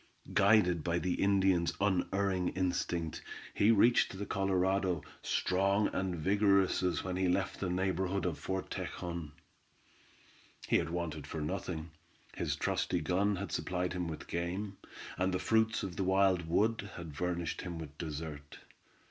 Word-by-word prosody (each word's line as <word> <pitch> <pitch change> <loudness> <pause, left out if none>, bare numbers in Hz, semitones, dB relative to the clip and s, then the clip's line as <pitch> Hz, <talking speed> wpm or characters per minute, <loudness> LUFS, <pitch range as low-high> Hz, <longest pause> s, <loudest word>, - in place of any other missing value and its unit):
Guided 95 -5 +4
by 85 0 0
the 90 +1 0
Indian's 95 -3 +3
unerring 95 -1 +1
instinct, 90 -3 -1 0.3
he 100 - +3
reached 115 -2 +4
the 100 - -4
Colorado, 95 -3 +1 0.2
strong 100 +3 +2
and 95 -1 -1
vigorous 100 +3 +3
as 90 -1 0
when 90 -1 -3
he 95 0 +2
left 95 +2 0
the 95 - -1
neighborhood 95 0 0
of 85 -4 -2
Fort 95 0 -3
Tejon. 85 -4 -4 1.4
He - - +4
had - - -1
wanted 80 -4 -3
for 80 - -5
nothing; 80 0 -4 0.4
his - - -1
trusty 90 - 0
gun 95 +5 +1
had 100 +2 -5
supplied 90 0 -1
him 90 -1 -2
with 80 -2 -6
game, 95 +4 -3 0.4
and 95 +1 +2
the 90 - +1
fruits 110 +4 +2
of 95 -3 -5
the 95 - 0
wild 95 -2 +3
wood 105 +4 +1
had 80 -4 -8
furnished 85 0 -2
him 85 -3 -5
dessert. 75 -2 -6
90 Hz, 145 wpm, -33 LUFS, 85-100 Hz, 1.4 s, Guided